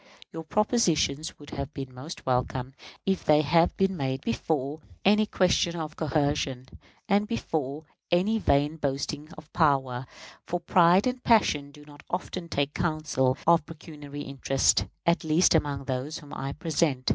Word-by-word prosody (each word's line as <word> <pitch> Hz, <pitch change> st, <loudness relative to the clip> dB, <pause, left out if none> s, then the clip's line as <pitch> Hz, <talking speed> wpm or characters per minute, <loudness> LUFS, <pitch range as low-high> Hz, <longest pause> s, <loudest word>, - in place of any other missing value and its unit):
Your 165 Hz, -, -6 dB
propositions 165 Hz, -, +1 dB
would 145 Hz, -, -13 dB
have 140 Hz, +2 st, -5 dB
been 135 Hz, -2 st, -6 dB
most 135 Hz, +7 st, -9 dB
welcome 130 Hz, 0 st, -1 dB, 0.3 s
if 190 Hz, -1 st, 0 dB
they 150 Hz, 0 st, +5 dB
had 165 Hz, +3 st, +3 dB
been 195 Hz, 0 st, +2 dB
made 135 Hz, -3 st, -2 dB
before 140 Hz, +5 st, -2 dB, 0.3 s
any 210 Hz, +2 st, +4 dB
question 180 Hz, -3 st, +2 dB
of 155 Hz, -2 st, -5 dB
coercion, 145 Hz, -4 st, -1 dB, 0.4 s
and 205 Hz, +1 st, +2 dB
before 155 Hz, -, -3 dB, 0.3 s
any 200 Hz, +6 st, +2 dB
vain 145 Hz, -3 st, +2 dB
boasting 145 Hz, +1 st, -3 dB
of 155 Hz, -1 st, -14 dB
power; 135 Hz, -6 st, +1 dB, 0.4 s
for 175 Hz, -, -3 dB
pride 175 Hz, +2 st, +4 dB
and 250 Hz, 0 st, -2 dB
passion 150 Hz, -11 st, +3 dB
do 145 Hz, 0 st, -15 dB
not 145 Hz, -1 st, -14 dB
often 180 Hz, -1 st, -4 dB
take 140 Hz, -1 st, -1 dB
counsel 155 Hz, -6 st, 0 dB
of 170 Hz, -2 st, +5 dB
pecuniary 150 Hz, -3 st, -9 dB
interest, 135 Hz, -1 st, +1 dB, 0.2 s
at 170 Hz, +1 st, +2 dB
least 160 Hz, +3 st, +4 dB
among 145 Hz, -4 st, 0 dB
those 135 Hz, +4 st, -3 dB
whom 145 Hz, -3 st, -12 dB
I 135 Hz, -, -4 dB
represent. 150 Hz, -3 st, -1 dB
150 Hz, 150 wpm, -27 LUFS, 140-170 Hz, 0.4 s, they